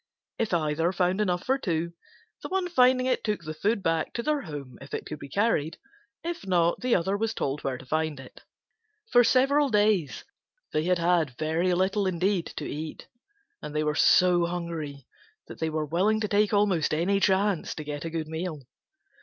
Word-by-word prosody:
If 225 - 0
either 165 0 +1
found 185 +2 +1
enough 180 -3 0
for 265 +1 +1
two, 170 -5 -2 0.5
the - - -6
one 375 -1 0
finding 255 -5 +4
it 255 -1 0
took 210 -5 -2
the 155 0 -5
food 205 +6 0
back 165 -1 0
to 235 - -3
their 300 0 0
home 145 - -8
if 135 +1 -6
it - - -5
could 155 - -7
be 140 - -9
carried. 180 -7 0 0.5
If 340 0 -4
not, 175 -2 +2
the 250 -1 +2
other 190 +3 0
was 225 +2 -1
told 140 +2 -2
where 135 -2 -2
to 130 - -13
find 155 +1 -1
it. 130 - -13 0.7
For 245 -1 +7
several 275 +4 +3
days 210 - +1 0.5
they 155 +1 +1
had 180 0 +2
had 170 -6 +1
very 160 +4 0
little 195 +2 +1
indeed 185 0 0
to 150 - -4
eat, 155 +2 -6 0.5
and 150 - -7
they 155 - +1
were 150 0 0
so 175 +2 +4
hungry 165 -6 -5 0.4
that - - -11
they 160 - 0
were 155 0 -2
willing 190 +8 +1
to 210 - 0
take 205 0 +2
almost 200 -8 +2
any 190 +5 +1
chance 195 -2 +1
to 155 - -6
get 145 -1 -5
a 165 - -3
good 160 -1 -3
meal. 160 -2 -5
175 Hz, 195 wpm, -27 LUFS, 155-210 Hz, 0.7 s, For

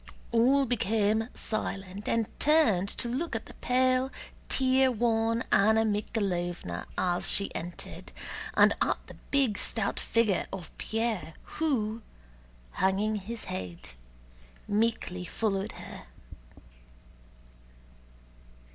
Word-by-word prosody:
All 260 +4 +4
became 220 -1 +1
silent 200 -2 -3
and 230 -1 +2
turned 240 - +4
to 240 - -2
look 260 +4 -2
at 225 - -3
the - - -12
pale 255 +1 +2 0.4
tear 260 0 +4
worn 230 0 +1
Anna 220 +3 +5
Mikháylovna 180 - -2
as 175 -1 +1
she 200 - +3
entered, 175 +1 -7 0.5
and - - +7
at - - +2
the - - -11 0.2
big 265 -7 +2
stout 220 -3 -1
figure 225 -5 +1
of 185 -4 -7
Pierre 220 -7 -2
who, 235 -8 -1 0.7
hanging 200 - +1
his 215 +3 -6
head, 90 -2 -6 0.8
meekly 205 -4 0
followed 195 +2 -1
her. - - -10
220 Hz, 100 wpm, -29 LUFS, 195-235 Hz, 0.8 s, and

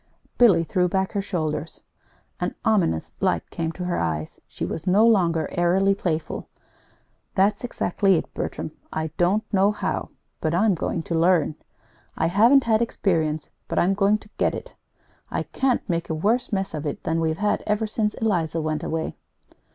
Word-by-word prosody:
Billy 195 -9 +6
threw 180 +2 +1
back 190 +1 0
her 200 - -1
shoulders. 160 -5 -3 0.6
An - - -2
ominous 190 - +1
light 85 - 0
came 165 -1 -2
to 180 - -5
her 180 - -1
eyes. 80 -2 -3
She - - -5
was 165 - -5
no 200 +5 +5
longer 170 -8 +3
airily 185 +3 +3
playful. 165 -5 -3 0.9
"That's 200 +3 +2
exactly 195 -4 +1
it, 160 - -3
Bertram. - - -4 0.2
I 160 0 -3
don't 190 +5 +2
know 195 +1 +4
how 210 - -3 0.3
but 155 +1 0
I'm 205 +3 +4
going 165 0 -2
to 170 - -4
learn. 165 -1 +3 0.6
I 160 - +1
haven't 230 +10 +5
had 225 -1 +2
experience 160 -9 0 0.2
but - - -4
I'm 185 +3 +3
going 200 +1 +3
to 215 - -18
get - - +2
it. - - -8 0.6
I - - -2
can't 265 -2 0
make 170 -3 -2
a 160 - -1
worse 220 +11 +1
mess 195 -3 -1
of 150 -1 -3
it 145 - -5
than 165 -1 0
we've 160 -1 0
had 210 +2 +1
ever 210 +1 +1
since 215 0 -1
Eliza 170 -7 0
went, 155 -1 -2
anyway!" 160 0 -2
180 Hz, 175 wpm, -24 LUFS, 160-210 Hz, 0.9 s, Billy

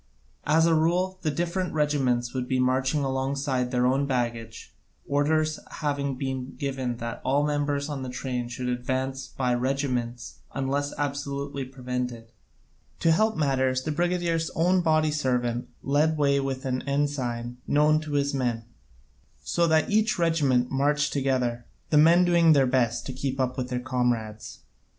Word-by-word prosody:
As 160 +2 +4
a 165 - +4
rule, 180 +4 +1
the 160 - 0
different 175 +3 -2
regiments 130 -5 +1
would 130 -1 -3
be 130 0 0
marching 130 +3 +1
alongside 135 -1 -1
their 125 -1 +1
own 135 +2 +2
baggage, 120 -3 -3 0.3
orders 155 +2 +1
having 140 -3 -2
been 130 0 -4
given 130 -3 -3
that 115 0 -5
all 140 +2 +2
members 145 -1 -1
of 145 -3 -4
the 130 - -5
train 125 -1 -3
should 125 +1 -4
advance 130 +2 -2
by 125 -2 -1
regiments 125 -2 -2 0.2
unless 140 +1 -1
absolutely 140 -1 -3
prevented. 125 -3 -5 0.7
To 165 - +4
help 215 +5 +2
matters 130 -3 +1
the 155 - -2
brigadier's 170 0 0
own 180 +3 +3
body 155 -2 +2
servant 125 -5 -1
led 150 +3 +2
the - - -6
way 140 -1 +3
with 135 -1 -3
an 130 -1 -1
ensign 125 -4 -1
known 150 +1 +3
to 155 -1 -6
his 140 0 +1
men, 120 -4 -1 0.8
so 170 - +1
that 160 +4 +2
each 215 +1 +2
regiment 145 -8 +2
marched 145 +2 +1
together, 130 -4 -1 0.2
the 150 - +6
men 170 +3 +6
doing 170 -2 +5
their 140 -2 +4
best 120 -2 +1
to 130 - -5
keep 135 +1 -3
up 130 -1 0
with 125 -1 -3
their 125 -1 -1
comrades. 120 -4 -2
135 Hz, 155 wpm, -26 LUFS, 125-150 Hz, 0.8 s, the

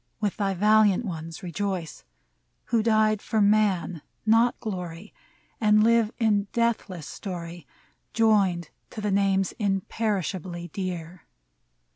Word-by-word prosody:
with 210 -3 -1
thy 195 -2 0
valiant 210 +2 +4
ones 165 -3 -6
rejoice, 180 - -4 0.7
Who 230 - +4
died 215 -1 +2
for 220 - -1
Man, 200 -5 +2 0.2
not 225 +2 +3
glory, 180 -2 -6 0.5
And 215 -1 +4
live 230 -1 +3
in 210 -3 +2
deathless 225 -8 -1
story, 175 -3 -7 0.4
Joined 200 -7 +2 0.2
to - - -8
the 210 -1 -1
names 195 -1 +2
imperishably 190 -4 -2
dear 175 -1 -6
200 Hz, 110 wpm, -26 LUFS, 180-215 Hz, 0.7 s, valiant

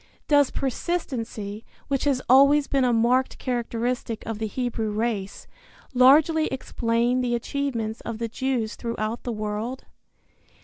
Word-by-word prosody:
Does 285 -2 +4
persistency, 235 - -3 0.2
which 275 -1 -1
has 270 -3 +1
always 280 +3 +6
been 275 -2 +1
a 250 - +3
marked 240 +3 +2
characteristic 240 -2 -2
of 225 -2 -4
the 220 - -1
Hebrew 230 -1 -2
race, 210 -2 -3 0.5
largely 300 +5 +5
explain 240 -1 0
the 240 -1 0
achievements 235 -3 -3
of 230 -1 -5
the 230 0 -2
Jews 240 -2 -2
throughout 230 -1 -3
the 245 - -4
world? 215 +4 -4
240 Hz, 130 wpm, -25 LUFS, 225-265 Hz, 0.5 s, always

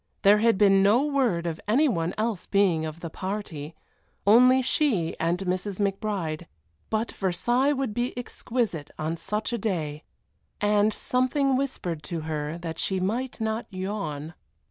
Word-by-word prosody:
There 205 +1 +6
had 230 -2 +3
been 195 -1 +5
no 215 +8 +4
word 255 - +1
of 165 -2 -3
any 270 +9 +4
one 170 - -1
else 215 -4 -2
being 180 -6 +2
of 155 +2 -8
the 165 - -6
party, 175 -6 -5 0.5
only 250 +5 +6
she 235 - +1
and 170 +2 +1
Mrs. 185 +1 -2
McBride, 195 -5 -2 0.4
but 220 +1 -1
Versailles 240 +9 +1
would 270 -5 -2
be 240 +3 -1
exquisite 230 - -2
on 155 +2 -2
such 210 +7 -2
a 235 - -1
day, 160 -8 -2 0.6
and 210 +1 +3
something 255 +4 +1
whispered 250 - -2
to 170 -1 -4
her 155 0 -3
that 165 -2 -6
she 190 -1 0
might 235 +8 -2
not 220 +1 -2
yawn. 185 -6 -4
200 Hz, 150 wpm, -26 LUFS, 170-235 Hz, 0.6 s, There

